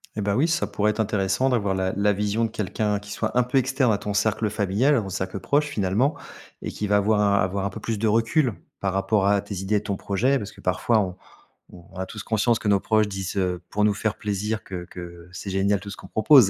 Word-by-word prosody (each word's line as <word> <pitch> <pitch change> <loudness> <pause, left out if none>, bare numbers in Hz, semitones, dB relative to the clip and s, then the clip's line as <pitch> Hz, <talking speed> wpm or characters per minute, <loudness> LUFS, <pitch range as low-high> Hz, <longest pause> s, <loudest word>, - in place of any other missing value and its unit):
Et 105 - -2
bah, 100 0 0
oui, 150 +6 +3
ça 160 - +1
pourrait 105 +1 0
être 105 - -8
intéressant 105 +4 +1
d'avoir 100 -6 +1
la 95 0 0
la 105 +1 +3
vision 105 +3 0
de - - -2
quelqu'un 105 0 -1
qui 105 0 -11
soit 110 +3 -2
un 125 - +5
peu 130 +2 +2
externe 130 -1 +2
à - - +1
ton 105 0 -3
cercle 105 +1 +1
familial, 105 +8 +2
au 100 -4 -2
cercle 95 0 -3
proche 145 +8 +1
finalement 115 +4 +1 0.5
et - - -3
qui 105 - -3
va 105 0 +4
avoir 105 +1 +2
un 100 -1 +3
avoir 95 +1 -1
un 100 - 0
peu - - -8
plus 110 -3 -3
de 110 - +1
recul, 115 +3 +2 0.2
par 95 - 0
rapport 95 +1 +2
à 100 0 +4
tes 100 0 -7
idées 95 +3 -1
et 105 - +1
ton 100 -2 -2
projet. 125 +8 +1
Parce 105 -1 -6
que - - -16
parfois, 90 +5 +2
on 90 -3 -1 0.8
on - - -11
a 95 0 -3
tous 105 +1 -7
conscience 115 +1 +2
que 105 - -4
nos 100 -1 +4
proches 110 +1 +2
disent, 95 -1 -4
heu, 90 -2 0
pour 105 0 +1
nous 105 - +3
faire 105 +1 -2
plaisir 105 +1 -2
que 90 -2 -6
que 85 -1 -10
c'est 95 +2 -6
génial 100 +1 +2
tout 100 +1 -8
ce - - -8
qu'on - - -11
propose. 120 -2 +6
105 Hz, 255 wpm, -24 LUFS, 95-110 Hz, 0.8 s, propose